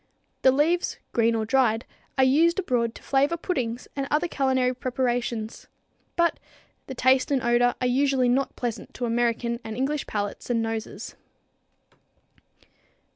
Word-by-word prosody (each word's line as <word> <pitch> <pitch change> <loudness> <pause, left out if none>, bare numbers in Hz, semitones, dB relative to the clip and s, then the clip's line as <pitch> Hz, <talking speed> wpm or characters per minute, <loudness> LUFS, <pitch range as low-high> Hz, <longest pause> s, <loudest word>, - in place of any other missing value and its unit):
The 260 - +6
leaves, 320 +6 +1 0.2
green 230 0 +3
or 220 -1 -1
dried, 230 -1 +2 0.3
are 265 - +5
used 320 +7 +4
abroad 245 -11 0
to - - -12
flavor 285 +5 +2
puddings 255 -9 -3
and 275 -1 -2
other 305 +4 +1
culinary 260 -4 +1
preparations, 245 -3 -2 0.5
but 340 0 +2 0.5
the 265 - -6
taste 260 +1 +3
and 275 -3 +1
odor 240 +1 +3
are 255 - -1
usually 265 0 +2
not 265 +3 +1
pleasant 240 -3 -5
to 245 - -2
American 235 0 0
and 220 0 -6
English 280 +3 -1
palates 205 +2 -4
and 240 -1 +1
noses. 225 -1 -4
250 Hz, 140 wpm, -25 LUFS, 235-275 Hz, 0.5 s, The